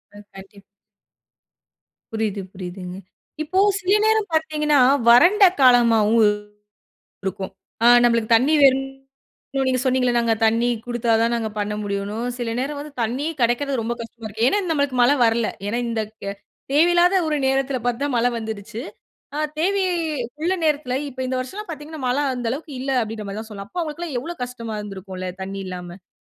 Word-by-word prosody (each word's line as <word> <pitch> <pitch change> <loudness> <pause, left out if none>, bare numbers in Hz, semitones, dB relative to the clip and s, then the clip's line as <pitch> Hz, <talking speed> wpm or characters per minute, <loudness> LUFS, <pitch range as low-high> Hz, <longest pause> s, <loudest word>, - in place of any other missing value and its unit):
அ, - - -11 0.2
கண்டிப்பா. 195 +1 -13 1.5
புரியுது, 215 -2 -2
புரியுதுங்க. 180 -1 -7 0.5
இப்போ 370 +5 0 0.2
சில 395 +1 +3
நேரம் 435 -2 +2
பார்த்தீங்கன்னா, 305 -2 +2 0.3
வறண்ட 355 - +6 0.2
காலமாவும் 230 -3 +5 1.0
இருக்கும். 190 0 -4 0.3
அ - - +6 0.2
நம்பளுக்கு 230 -1 +3
தண்ணி 265 +7 +2
வேணும் 270 0 +4 0.7
நீங்க 255 -1 +1
சொன்னீங்கல்ல 255 -2 +1
நாங்க 230 -1 +2
தண்ணி 230 +2 +3 0.2
குடுத்தா 240 -1 -2
தான் 230 +1 +2
நாங்க 230 -2 -1
பண்ண 210 0 -2
முடியும்ன்னும். 205 +3 -3
சில 235 -2 -2
நேரம் 285 +3 -3
வந்து 295 0 -9
தண்ணியே 260 +8 -2
கெடைக்கிறது 245 +2 +1
ரொம்ப 235 +2 -2
கஷ்டமா 230 0 -9
இருக்கு. 220 +3 0
ஏன்னா, 410 - +2
நம்மளுக்கு 285 -4 0
மழை 250 +4 +5
வரல்லை. 225 0 +2 0.2
ஏன்னா, 235 - -1
இந்த 225 -1 -1 0.2
க் - - -9
ய 200 - -2 0.4
தேவையில்லாத 345 +4 +4
ஒரு 305 -1 0
நேரத்தில 270 0 +1
பார்த்து 245 +2 -1
தான் 285 -3 -1
மழை 235 +1 +3
வந்துருச்சு. 220 0 -6 0.6
ஆ - - -2 0.2
தேவையே 375 +2 +1 0.5
உள்ள 350 +3 +1
நேரத்தில, 285 -5 0
இப்ப 260 0 -9
இந்த 255 0 -2
வருஷம்ல்லாம் 385 +11 -7
பார்த்தீங்கன்னா, 310 -1 -8
மழை 255 +4 +1
அந்த 245 -2 -3
அளவுக்கு 295 +2 -6
இல்லை." 270 0 -1
அப்படீன்ற 215 -1 -6
மாதிரி 200 +2 -5
தான் 220 0 -10
சொல்லலாம். 200 -1 -8
அப்போ 355 - -3
அவங்களுக்கெல்லாம் 315 -2 -5
எவ்வளோ 340 +7 -6
கஷ்டமா 230 -3 -6
இருந்திருக்கும்ல்ல, 190 -2 -7
தண்ணி 195 +1 -5
இல்லாம? 180 -1 -6
அப்ப 185 - -46
245 Hz, 160 wpm, -22 LUFS, 220-290 Hz, 1.5 s, வறண்ட